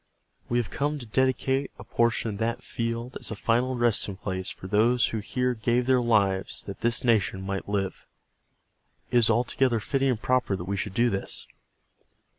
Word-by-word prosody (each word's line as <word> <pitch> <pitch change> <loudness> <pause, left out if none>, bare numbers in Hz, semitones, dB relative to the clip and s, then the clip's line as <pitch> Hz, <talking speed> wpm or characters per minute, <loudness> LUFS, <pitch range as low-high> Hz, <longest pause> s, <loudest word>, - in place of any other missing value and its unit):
We 120 - +1
have 120 -4 -1
come 145 +1 -1
to 130 - -7
dedicate 130 +3 +1
a - - -9
portion 115 0 +1
of 100 - -6
that 115 +1 -1
field 115 +1 -3
as - - -4
a 110 - -4
final 120 +4 +1
resting 115 -5 +1
place 95 -1 -4
for - - -9
those 115 +5 +3
who 110 - -2
here 125 +4 -1
gave 120 +2 +1
their 130 -1 +3
lives 100 -5 +1
that 100 - -8
this 120 0 +2
nation 105 -5 +2
might 100 0 -4
live. 100 -2 -2 1.0
It - - +4
is 115 - +5
altogether 120 +1 +2
fitting 135 +5 0
and 120 -4 0
proper 125 -4 +1
that 90 - -5
we 100 +2 -2
should 100 0 -4
do 120 0 +3
this. 100 - -3
115 Hz, 185 wpm, -27 LUFS, 100-125 Hz, 1.0 s, is